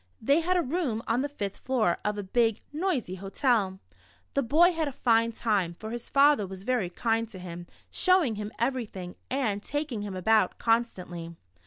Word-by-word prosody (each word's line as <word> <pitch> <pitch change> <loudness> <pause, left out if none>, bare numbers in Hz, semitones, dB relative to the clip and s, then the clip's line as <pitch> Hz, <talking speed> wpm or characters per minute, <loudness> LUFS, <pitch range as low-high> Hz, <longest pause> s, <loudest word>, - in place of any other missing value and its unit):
They 280 +7 +3
had 365 +2 +1
a 350 - +2
room 260 -6 -1
on 235 +3 +1
the 290 - -2
fifth 205 -8 -4
floor 230 -9 0
of 210 0 -1
a 205 - -3
big, 225 +2 +1
noisy 305 - -1
hotel. 195 0 0 0.5
The - - +2
bov 320 +9 +4
had 320 -2 -1
a - - -3
fine 230 -3 +2
time, 205 -7 0
for 220 +5 -7
his 240 0 -6
father 280 -6 +4
was 190 0 -8
very 240 -6 0
kind 225 +4 0
to 205 - -10
him, 175 -1 -8 0.2
showing 365 -10 +3
him 210 0 -5
everything, 225 -8 -2 0.2
and 230 -7 0
taking 290 -4 -3
him 205 -2 -5
about 185 +1 +2
constantly. 180 -8 -1
225 Hz, 180 wpm, -28 LUFS, 195-275 Hz, 0.5 s, bov